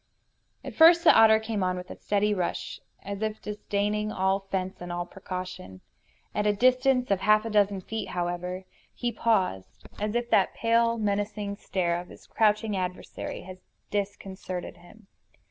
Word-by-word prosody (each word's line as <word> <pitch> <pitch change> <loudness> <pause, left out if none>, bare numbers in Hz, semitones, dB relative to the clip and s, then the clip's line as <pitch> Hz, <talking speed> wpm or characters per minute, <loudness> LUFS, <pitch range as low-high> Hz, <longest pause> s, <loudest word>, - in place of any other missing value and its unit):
At - - -7
first 335 +1 +7
the - - +7
otter 220 -1 +7
came 220 -2 -3
on 185 0 0
with 180 0 -8
a - - -7
steady 210 +1 0
rush, 180 -3 -3 0.2
as 200 +1 -5
if 220 0 -2
disdaining 210 0 -2
all 190 0 +1
fence 190 -1 -4
and 175 0 -6
all 175 0 -3
precaution. 185 - -7 0.5
At 210 0 0
a 210 - +4
distance 255 +1 +3
of 195 - +3
half 215 +2 +4
a 225 - -3
dozen 205 -2 +2
feet, 220 +4 -5
however, 180 +1 -3 0.3
he 240 -1 -2
paused, 185 - -1 0.2
as 210 +2 -2
if 240 0 -1
that - - +3
pale, 230 0 +2
menacing 205 -1 -2
stare 175 -4 -1
of 180 - -13
his - - -15
crouching 210 -1 +1
adversary 180 -1 -5
had 185 0 -10 0.3
disconcerted 195 -3 -4
him. 205 +5 -18
205 Hz, 165 wpm, -27 LUFS, 185-220 Hz, 0.5 s, first